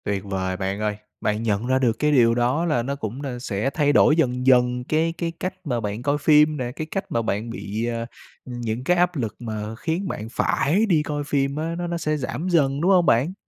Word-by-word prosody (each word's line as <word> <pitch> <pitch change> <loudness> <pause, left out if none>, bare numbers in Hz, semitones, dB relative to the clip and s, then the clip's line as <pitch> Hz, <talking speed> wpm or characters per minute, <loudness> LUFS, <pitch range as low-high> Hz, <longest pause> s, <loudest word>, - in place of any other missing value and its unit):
Tuyệt 100 -2 -2
vời 95 -1 -2
bạn 95 +1 -2
ơi, 105 -1 -1 0.3
bạn 105 +1 -1
nhận 110 +1 0
ra 130 0 +2
được 120 -3 +1
cái 150 0 +2
điều 115 -5 +4
đó 125 +7 +1
là 135 -8 +1
nó 140 +3 -2
cũng 125 -1 -5
đà 130 -4 -5
sẽ 110 0 -2
thay 145 0 +1
đổi 150 - +5
dần 125 -5 0
dần 125 -1 +4
cái 160 +5 0
cái 165 0 -2
cách 185 - -2
mà 125 -5 -1
bạn 105 0 -4
coi 145 +2 +1
phim 150 +1 +4
nè, 125 -2 -3
cái 155 +4 -6
cách 195 - -4
mà 115 - +1
bạn 110 +1 -2
bị, 110 0 -4
à, 115 -1 -2 0.4
những 120 -1 -4
cái 180 +5 +2
áp 180 0 +2
lực 115 -7 -3
mà 110 -2 -5
khiến 165 - -2
bạn 110 - -5
phải 175 - +1
đi 165 -8 +2
coi 145 -1 -3
phim 140 -1 0
á 160 +2 -3
nó 175 0 -3
nó 170 0 -2
sẽ 155 -2 -1
giảm 150 +6 -3
dần, 145 -5 +2
đúng 180 +4 +3
hông 180 -3 +5
bạn? 135 +9 +3
130 Hz, 240 wpm, -23 LUFS, 115-155 Hz, 0.4 s, đổi